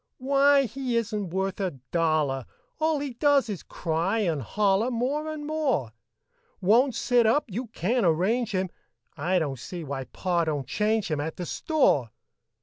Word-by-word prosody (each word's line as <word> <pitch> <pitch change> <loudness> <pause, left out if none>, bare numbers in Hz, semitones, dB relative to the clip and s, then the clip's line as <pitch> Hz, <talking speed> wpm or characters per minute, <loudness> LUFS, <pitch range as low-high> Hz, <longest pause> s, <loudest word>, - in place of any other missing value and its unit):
Why, 275 +1 +4
he 250 0 -2
isn't 210 -4 -2
worth 190 +2 -2
a 185 -8 -2
dollar! 155 -6 +1 0.3
All 315 0 +2
he 280 -2 -4
does 280 -1 +3
is 200 -5 -4
cry 170 +6 -1
and 165 -8 0
holler 200 - +1
More 275 +6 -1
and 300 -1 -6
more; 285 - 0 0.7
Won't 235 +7 +3
sit 245 -3 +3
up 285 +7 +3
you 235 +6 -4
can't 230 +3 0
arrange 195 +8 +2
him, 185 -1 -1 0.4
I 185 +2 0
don't 140 -7 -1
see 175 +6 -6
why 135 -2 -4
Pa 175 +2 -1
do'n't 145 -4 -2
change 210 - 0
him 150 -2 0
At 160 +2 -4
the 180 - -4
store. 170 - +1
205 Hz, 160 wpm, -26 LUFS, 165-255 Hz, 0.7 s, Why